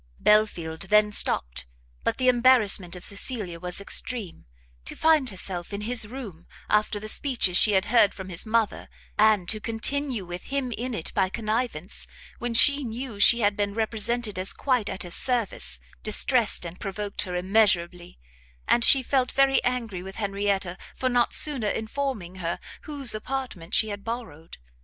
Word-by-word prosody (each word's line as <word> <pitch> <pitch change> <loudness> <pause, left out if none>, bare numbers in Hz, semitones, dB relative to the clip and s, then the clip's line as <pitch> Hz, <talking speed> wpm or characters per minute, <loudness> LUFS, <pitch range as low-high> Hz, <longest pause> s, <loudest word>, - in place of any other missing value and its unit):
Belfield 180 -7 +2
then 210 0 +4
stopt; - - +1 0.4
but - - -1
the 255 - 0
embarrassment 235 -8 +4
of 180 - -10
Cecilia 200 -4 -2
was 180 +1 -4
extreme; 200 -1 -1 0.4
to - - -8
find 310 -5 +3
herself 185 -1 -3
in 200 - -4
his 225 0 +1
room 210 -9 -9 0.2
after 210 0 +1
the 215 - -8
speeches 225 -6 +1
she 210 +3 +6
had 190 0 +2
heard 215 -3 +4
from 190 -1 -9
his 175 0 -2
mother, 225 -1 -1 0.3
and 210 -4 +3
to 215 - 0
continue 230 0 -2
with 175 +1 -8
him 275 -3 -3
in 240 +1 -4
it 160 - -5
by 190 -2 +1
connivance, 215 -4 -3 0.3
when 240 -1 -3
she 285 +4 +6
knew 235 -2 -6
she 235 +4 +5
had 205 -1 +2
been 205 0 -2
represented 220 -1 -2
as 185 - 0
quite 250 -6 0
at - - -4
his 175 -1 -6
service, 215 - -1 0.2
distressed 220 -1 +2
and 170 +2 -8
provoked 200 0 -4
her 180 -3 -4
immeasurably; 180 -2 +1 0.5
and 235 - +3
she 270 +1 +5
felt 255 0 0
very 270 0 +3
angry 230 -7 -2
with 190 +1 -9
Henrietta 200 -3 -2 0.2
for 255 - -1
not 245 -1 +2
sooner 265 -9 +3
informing 220 -5 -4
her 170 -2 -3 0.3
whose 280 -6 +2
apartment 215 -6 -4
she 220 - +3
had 205 -1 -6
borrowed. 225 -9 -7
215 Hz, 165 wpm, -25 LUFS, 190-245 Hz, 0.5 s, she